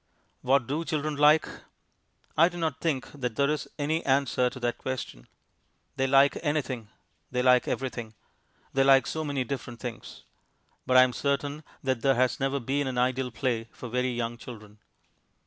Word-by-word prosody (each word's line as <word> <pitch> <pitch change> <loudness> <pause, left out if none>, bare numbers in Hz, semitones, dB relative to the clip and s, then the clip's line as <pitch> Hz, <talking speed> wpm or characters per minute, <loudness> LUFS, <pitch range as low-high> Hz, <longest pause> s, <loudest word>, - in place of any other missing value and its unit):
What 130 -1 +3
do 150 +7 -2
children 155 -2 -2
like? 150 +2 +5 0.9
I 165 +3 +6
do 175 - -9
not 160 -5 -2
think 150 -6 -1
that 125 -6 -4
there 140 +3 +2
is 150 - -2
any 155 +3 -1
answer 135 -2 +2
to 130 - -10
that 120 -1 -2
question. 125 - -5 0.7
They 135 - +1
like 140 +1 +4
anything; 135 -8 -2 0.4
they 125 0 -1
like 125 -1 +5
everything; 120 -4 -4 0.6
they 135 - +3
like 135 -1 +6
so 160 - -3
many 140 -3 -1
different 125 -2 -6
things. 120 -3 -8 0.6
But 130 0 +5
I 130 - +10
am 125 -1 0
certain 145 +4 -2 0.2
that 130 -3 0
there 135 +1 +3
has 125 -1 +1
never 135 +1 0
been 135 +3 -1
an 130 -1 -3
ideal 130 +1 +1
play 115 -1 -2
for 125 - -8
very 125 +2 0
young 120 -1 -3
children. 110 -4 -11
130 Hz, 170 wpm, -28 LUFS, 125-145 Hz, 0.9 s, I